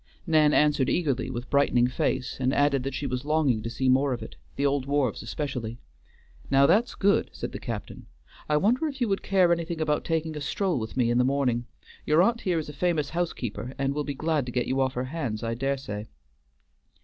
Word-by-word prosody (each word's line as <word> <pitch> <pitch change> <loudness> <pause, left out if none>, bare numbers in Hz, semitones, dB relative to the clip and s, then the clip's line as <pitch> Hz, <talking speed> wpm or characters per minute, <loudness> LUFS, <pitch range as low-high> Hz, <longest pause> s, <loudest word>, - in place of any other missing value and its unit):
Nan 155 -3 +4
answered 150 -3 +3
eagerly 135 -7 0
with 120 -1 -6
brightening 140 -4 +4
face, 125 0 -1
and 130 0 +1
added 145 -2 +3
that 135 +1 -4
she 140 - -3
was 125 -1 -2
longing 150 -6 +1
to 115 - -4
see 130 +3 -2
more 130 +1 +3
of 120 - -5
it; - - -10 0.2
the 140 - 0
old 140 -1 +1
wharves 140 -5 0
especially. 120 -2 -4 0.7
"Now 135 0 +5
that's 210 +10 +3
good," 200 0 +2
said - - -5
the - - -6
captain; - - -6 0.4
"I 150 - +3
wonder 240 - +2
if 280 -2 -6
you 240 - +1
would 195 - 0
care 185 -3 +3
anything 170 -1 -3
about 150 -1 0
taking 160 -1 -1
a 150 - -5
stroll 175 +2 -1
with 110 +2 -6
me 120 -2 +2
in 120 - +2
the - - +4
morning. 125 -3 0 0.4
Your 155 +3 +4
aunt 235 +3 +1
here 180 -4 0
is 155 - -3
a 150 - -7
famous 155 -1 0
housekeeper, 125 -8 -3
and 135 0 0
will 150 +1 -1
be 145 -1 -4
glad 155 -2 0
to - - -4
get 125 0 0
you 135 +1 0
off 130 0 0
her 125 - -1
hands, 130 -7 -4
I 115 0 -1
dare 135 +3 -1
say." 110 -5 -6
140 Hz, 220 wpm, -27 LUFS, 125-160 Hz, 0.7 s, Now